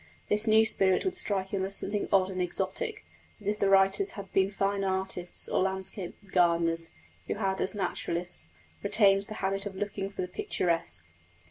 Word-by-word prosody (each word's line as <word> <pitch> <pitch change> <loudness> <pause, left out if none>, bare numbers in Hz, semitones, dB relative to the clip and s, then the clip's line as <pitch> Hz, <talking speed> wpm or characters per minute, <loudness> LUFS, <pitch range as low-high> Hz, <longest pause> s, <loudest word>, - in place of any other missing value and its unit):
This 210 +2 +3
new 220 0 +6
spirit 190 -4 +2
would 375 - -1
strike 195 -2 +1
him 195 -1 -2
as 195 +1 0
something 205 +1 0
odd 190 -1 +3
and 185 -1 -3
exotic, 190 - -2 0.3
as 210 - -14
if 210 +1 -1
the 200 - +2
writers 195 - +4
had 195 -2 -9
been 195 0 +3
first 200 0 -1
artists 190 -2 -2
or - - 0
landscape 190 -1 -2 0.2
gardeners, 170 -2 +2 0.4
who - - -2
had, 195 -2 -1
as 190 - -1
naturalists, 175 - -1 0.3
retained 195 -2 +5
the 215 - -7
habit 195 +1 -1
of 195 - -8
looking 195 0 -4
for 195 - -5
the - - -4
picturesque. 165 - -2
195 Hz, 175 wpm, -29 LUFS, 180-200 Hz, 0.4 s, new